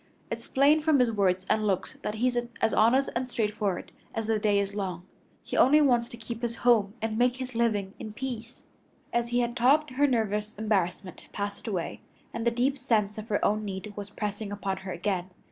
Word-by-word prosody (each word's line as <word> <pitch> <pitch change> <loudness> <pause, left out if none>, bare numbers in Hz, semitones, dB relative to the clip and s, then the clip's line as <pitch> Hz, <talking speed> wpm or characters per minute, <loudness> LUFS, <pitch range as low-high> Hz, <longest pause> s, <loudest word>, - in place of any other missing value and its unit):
It's - - -5
plain 290 +3 +4
from 310 -1 +4
his 250 -3 +3
words 185 -3 +1
and 215 -1 +2
looks 190 -3 -1
that 210 - -3
he's 245 +2 +1 0.2
as 225 - +2
honest 255 +5 +4
and 250 +1 -1
straightforward 210 -5 -1 0.2
as 225 - -1
the 220 -1 +1
day 205 -1 +2
is 200 0 0
long. 185 -4 -4 0.4
He - - -5
only 295 +4 +6
wants 245 -5 +3
to 235 - -9
keep 230 0 -6
his 235 -1 -2
home 220 -4 +4
and 220 0 -1
make 245 0 +3
his 255 0 -6
living 215 -4 0
in 215 - -7
peace." 240 -1 -6 0.5
As 235 0 +1
he 240 +1 +1
had 240 0 -1
talked 275 +4 +4
her 285 +3 +3
nervous 215 -4 0
embarrassment 195 -4 -2
passed 205 +2 -4
away, 185 -6 -3 0.3
and 230 - -2
the - - +7
deep 255 +4 0
sense 215 -5 +1
of 215 - -8
her 205 - +1
own 215 +1 +1
need 200 +1 -5
was 205 -1 -6
pressing 210 0 -4
upon 200 -1 -2
her 190 0 -7
again. 185 +1 -2
220 Hz, 205 wpm, -28 LUFS, 205-245 Hz, 0.5 s, the